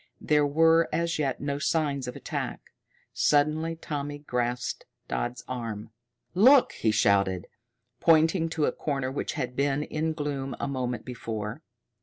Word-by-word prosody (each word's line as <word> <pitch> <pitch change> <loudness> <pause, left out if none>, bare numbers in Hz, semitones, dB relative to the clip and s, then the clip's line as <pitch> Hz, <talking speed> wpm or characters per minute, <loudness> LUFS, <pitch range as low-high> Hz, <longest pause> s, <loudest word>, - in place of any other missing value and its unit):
There 150 -1 +3
were 165 +3 +4
as 170 -1 0
yet 140 -3 0
no 140 0 -2
signs 145 -4 0
of 125 - -5
attack. - - -5 0.4
Suddenly 155 +3 +2
Tommy 145 -2 -4
grasped 125 -3 -2 0.2
Dodd's 60 - -3
arm. 115 -3 -5 0.4
"Look!" 250 +9 +6
he 110 - 0
shouted, 100 -3 +2 0.5
pointing 165 +1 +4
to 160 -2 0
a - - +1
corner 135 -3 -2
which 140 - -3
had 125 -4 -3
been 140 +1 +1
in 160 +1 -2
gloom 145 -3 -3
a - - -2
moment 125 -3 -3
before. 115 0 -5
140 Hz, 140 wpm, -27 LUFS, 125-155 Hz, 0.5 s, Look